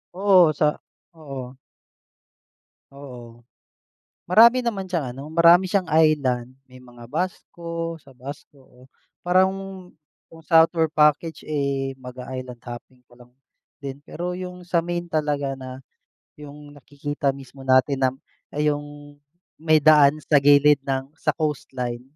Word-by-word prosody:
Oo, 185 -4 +5
sa 150 0 0 0.3
oo. 135 -5 -9 1.4
Oo. 120 -4 -12 0.9
Marami 235 +6 +6
naman 215 -6 -3
siyang 155 -9 -3
ano, 135 - -8
marami 170 +2 +6
siyang 190 -2 0
island. 140 -6 +2 0.2
May 130 0 -15
mga 120 -1 -14
Basco, 170 0 -4
sa 140 -2 -19
Basco 140 +2 -11
oh, 125 0 -21 0.4
parang 185 +1 +4 0.8
yung 165 - -13
southward 160 +1 +4
package, 150 +2 +2
eh, 140 -2 -2
mag-i-island 125 -1 -8
hopping 120 +1 -10
ka 120 - -29
lang 125 0 -19 0.5
din. 140 0 -7
Pero 175 +1 -5
yung 180 -1 -8
sa 175 -1 +1
main 175 0 -3
talaga 150 -3 -1
na 130 0 -9 0.6
yung 145 0 -12
nakikita 145 0 -4
mismo 135 0 -13
natin 130 +1 +3
na 130 - +4 0.5
yung 145 -1 -3 0.5
may 155 -1 +3
daan 150 -1 +6
sa 150 - +3
gilid 145 0 +5
ng 135 +1 -3
sa - - 0
coastline, 125 -5 -3
145 Hz, 125 wpm, -23 LUFS, 130-165 Hz, 1.4 s, Marami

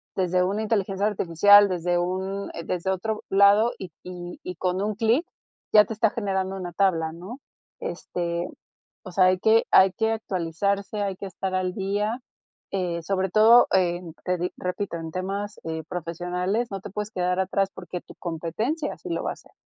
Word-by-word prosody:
desde 180 -1 +2
una 200 +4 -1
inteligencia 200 -2 0
artificial, 205 +1 +6
desde 175 -1 0
un, 190 +3 -2
eh 170 - -6
desde 180 +2 -2
otro 215 +3 -2
lado 200 +4 +5
y 185 -3 -8
y 175 -1 -8
y 180 - -5
con 180 +2 -1
un 210 +1 -1
clic 230 - +2 0.5
ya 210 -1 +8
te 225 - -5
está 225 0 +2
generando 195 -3 -2
una 180 -2 -5
tabla, 165 -4 +1
¿no? 185 - -9 0.4
Este, 170 0 -3 0.6
o 185 - -8
sea, 185 0 +5
hay 185 0 +3
que 220 +4 +4
hay 190 0 +6
que 220 +3 0
actualizarse, 200 +1 -2
hay 200 -1 -1
que 195 - -7
estar 190 0 -4
al 185 -1 0
día, 205 +3 -1 0.5
eh, 175 -3 -2
sobre 190 +2 -1
todo, 225 +4 +7
en 175 -2 +1
te 180 -1 0
di 180 +1 -1
repito, 180 0 -3
en 160 -1 -6
temas, 200 +3 -4
eh, 160 -1 -4
profesionales, 180 +6 -2
no 195 - -4
te 195 - -9
puedes 210 +2 -4
quedar 180 0 0
atrás 195 +1 +1
porque 180 - -7
tu - - -15
competencia 190 - -3
sí 365 - -9
lo - - -1
va - - -1
a - - -4
hacer, - - -21
190 Hz, 185 wpm, -25 LUFS, 180-205 Hz, 0.6 s, ya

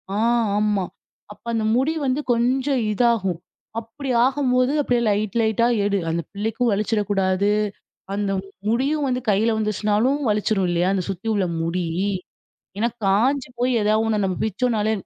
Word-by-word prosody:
ஆ, - - 0 0.4
ஆமா. 210 -3 +1 0.5
அப்ப 210 - -27
அந்த 220 - 0
முடி 270 +6 +2
வந் 260 -1 +1
து - - -1
கொஞ்சம் 255 +2 +1
இதாகும். 210 -7 +1 0.4
அப்பிடி 245 +5 -8 0.2
ஆகும்போது, 255 -1 +2
அப்டியே 245 -3 +1
லைட் 210 +1 -1
லைட்டா 220 +2 +2 0.2
எடு. 200 -1 +1
அந்த 165 +1 -1
பிள்ளைக்கும் 225 +4 -1
வலிச்சிறக்கூடாது. 200 -2 +1 0.6
அந்த 200 -1 -1 0.4
முடியும் 275 +6 +1
வந்து 255 -1 -1
கையில 215 +3 +3
வந்துச்சுனாலும், 215 +5 +1
வலிச்சிரும் 210 -2 +1
இல்லயா! 175 +1 +1
அந்த 185 -2 0
சுத்தி 195 +3 -5
உள்ள 200 -3 +1 0.2
முடி. 170 +1 -1 0.9
ஏன்னா, 230 - +2 0.2
காஞ்சு 250 +8 +2
போய் 250 +1 +2
ஏதாவது 215 +1 +2
ஒண்ண 215 -1 +1
நம்ம 185 -2 -1
பிச்சோன்னாலே, 220 0 0
215 Hz, 145 wpm, -22 LUFS, 200-250 Hz, 0.9 s, கையில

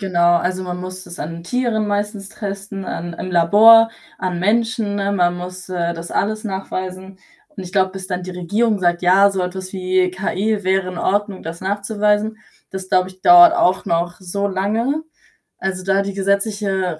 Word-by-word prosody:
Genau, 175 -3 +3
also 185 +2 -1
man 180 0 -5
muss 185 0 -7
das 175 0 -10
an 165 +2 -5
Tieren 220 +1 -1
meistens 205 -1 -2
testen, 200 -2 -6
an 175 -1 -5
im 185 +2 -6
Labor, 220 +7 +7 0.3
an 180 -2 -3
Menschen, 225 0 0
ne? 200 0 -1
Man 175 -2 +1
muss, 180 +1 -8
äh, 170 -2 -1
das 170 0 -8
alles 215 +2 -1
nachweisen 190 -1 -5 0.4
und 190 - -6
ich 180 - -9
glaube, 190 -1 +2
bis 190 -1 -6
dann 180 -1 -3
die 185 - -7
Regierung 205 +5 0
sagt: 175 -1 +1
„Ja, 195 +3 +5
so 190 -1 -2
etwas 185 +1 -5
wie 185 -1 0
KI 195 +2 -2
wäre 190 -1 +1
in 180 - -8
Ordnung, 205 +1 -1
das 165 +1 -7
nachzuweisen.“ 210 +2 0 0.3
Das 190 -1 -7
glaube 185 0 +2
ich, 185 0 -15
dauert 350 -1 +8
auch 190 - +2
noch 170 +2 -1
so 200 +2 -2
lange. 225 +10 -1 0.6
Also, 185 -1 -3
da 195 0 +2
die 200 0 -4
gesetzliche 195 -3 -1
190 Hz, 180 wpm, -19 LUFS, 180-205 Hz, 0.6 s, dauert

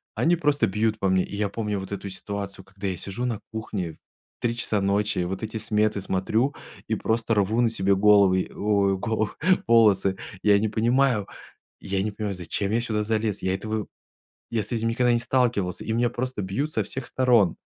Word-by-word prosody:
они 175 +2 +3
просто 150 -3 +2
бьют 105 +2 0
по 95 - +1
мне. 95 0 +3
И 100 - -7
я 105 -1 0
помню 105 -2 -2
вот 95 - -8
эту 100 0 -5
ситуацию, 100 -1 -6
когда 95 +1 -6
я 90 -2 -2
сижу 100 +7 -4
на 115 -4 -2
кухне 100 -7 -4
в - - -21 0.4
3:00 115 -1 -1
часа 105 -3 0
ночи, 100 0 +1
вот 95 +4 -3
эти 110 +1 -4
сметы 105 -2 +1
смотрю 110 +9 0 0.3
и - - 0
просто 115 0 0
рву 105 +4 +2
на 115 - +3
себе 100 -3 +1
головы, 100 -2 +4
ой, 100 -2 +1
головы 110 +1 -1 0.4
волосы. 105 -4 +4 0.3
Я 100 -1 +5
не 110 - +1
понимаю 120 -1 +2 0.6
я 95 0 -1
не 105 +1 -1
понимаю, 100 -2 -4
зачем 95 +3 -2
я 115 +2 +2
сюда 110 -3 -1
залез. 110 -1 -1
Я 95 0 +1
этого 110 0 -3 0.6
я 115 -2 0
с 105 - -3
этим 115 0 0
никогда 125 +1 +2
не 120 - +3
сталкивался, 120 -7 0
и 110 - -2
меня 120 +1 +2
просто 125 -3 -3
бьют 110 +12 -2
со - - +1
всех 135 -2 -6
сторон. 120 -9 +3
105 Hz, 195 wpm, -25 LUFS, 100-115 Hz, 0.6 s, Я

